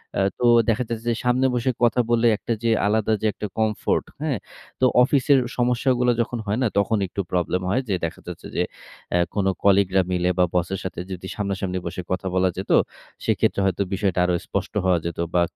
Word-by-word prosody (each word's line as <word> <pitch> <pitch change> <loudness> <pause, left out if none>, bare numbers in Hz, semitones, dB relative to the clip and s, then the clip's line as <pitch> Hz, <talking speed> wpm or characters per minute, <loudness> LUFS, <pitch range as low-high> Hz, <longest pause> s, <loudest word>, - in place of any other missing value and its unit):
অ্যাঁ 95 0 +2
তো 125 - +1 0.2
দেখা 115 +2 +2
যাচ্ছে 115 0 -4
যে 115 - +1
সামনে 125 +2 +3
বসে 125 +2 +1
কথা 120 +1 +3
বললে 120 0 +3
একটা 115 - -2
যে 115 - +2 0.2
আলাদা 110 +1 +1
যে - - -2
একটা 105 - -5
comfort, 110 -1 0 0.2
হ্যাঁ? 150 -6 0 0.4
তো 130 - +4 0.2
অফিসের 135 +1 +3 0.2
সমস্যাগুলো 125 0 +2
যখন 120 +1 -3
হয় 105 +4 0
না, - - +3
তখন 105 +2 +1
একটু 100 +2 -3
প্রবলেম 90 0 0
হয় 125 +7 +1
যে 95 - +2
দেখা 80 - -6
যাচ্ছে - - -7
যে, - - +2 0.5
আ - - +4 0.2
কোনো 100 -2 +2
কলিগরা 95 -1 +4
মিলে 90 0 +1
বা 90 - +6
বসের 90 +2 0
সাথে 95 - -5
যদি 95 0 -6
সামনাসামনি 95 -2 -2
বসে 90 +1 -4
কথা 95 +1 -1
বলা 95 0 +3
যেত, 95 - -4 0.5
সেক্ষেত্রে - - +1
হয়তো 95 +1 0
বিষয়টা 95 -2 0
আরো 90 - +1
স্পষ্ট - - -3
হওয়া 90 -2 +3
যেত 85 - -4 0.2
বা 90 - +3
100 Hz, 195 wpm, -23 LUFS, 95-120 Hz, 0.5 s, বা